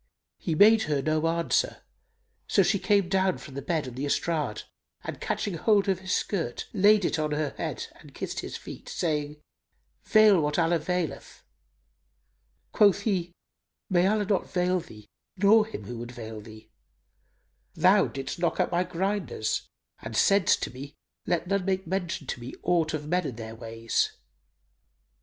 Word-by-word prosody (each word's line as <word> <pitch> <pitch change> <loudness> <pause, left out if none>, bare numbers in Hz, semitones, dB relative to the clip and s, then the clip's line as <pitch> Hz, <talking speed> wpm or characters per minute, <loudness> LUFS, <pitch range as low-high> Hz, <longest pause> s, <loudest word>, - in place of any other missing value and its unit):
He 160 - -2
made 220 +6 +7
her 145 -2 +1
no 155 +3 +1
answer: 170 0 0 0.6
so 195 - +4
she 195 +2 +1
came 200 -2 +2
down 190 0 +1
from 140 - -11
the 140 - -5
bed 155 0 -1
on 125 - -7
the 135 +4 -3
estrade; 150 -6 -1 0.4
and - - -6
catching 205 - -2
hold 200 +4 +2
of 190 -2 +1
his 190 -1 -6
skirt 165 - -2
laid 205 -1 +5
it 165 - 0
on 150 -1 -1
her 150 -2 -1
head - - -3
and - - -15
kissed - - -4
his - - -5
feet, - - -10
saying, 150 -3 -2 0.7
"Veil 215 -5 +6
what 150 0 -1
Allah 170 0 +2
veileth!" 175 0 -4 1.3
Quoth 200 -1 +4
he, 185 -5 -1 0.6
"May 180 0 +4
Allah 210 0 +1
not 200 -2 0
veil 180 0 +1
thee 110 -12 -12 0.3
nor 210 +3 +5
him 220 - -7
who 115 +3 -7
would 120 +1 -7
veil 110 -3 -8
thee! 110 +1 -14 1.0
Thou - - +5
didst 135 +4 -6
knock 175 +1 0
out 180 - +1
my 175 +1 +2
grinders 180 - -2 0.3
and - - -5
saidst 195 -3 +4
to - - -3
me, 140 +3 -9 0.3
'Let 175 -1 0
none 200 +1 0
make 190 0 -1
mention 175 -4 -3
to 125 - -4
me 120 +2 -8
aught 165 -3 +1
of 150 -1 -6
men 180 0 0
and 120 - -6
their 110 -1 -7
ways! 115 0 -2
170 Hz, 165 wpm, -27 LUFS, 145-190 Hz, 1.3 s, made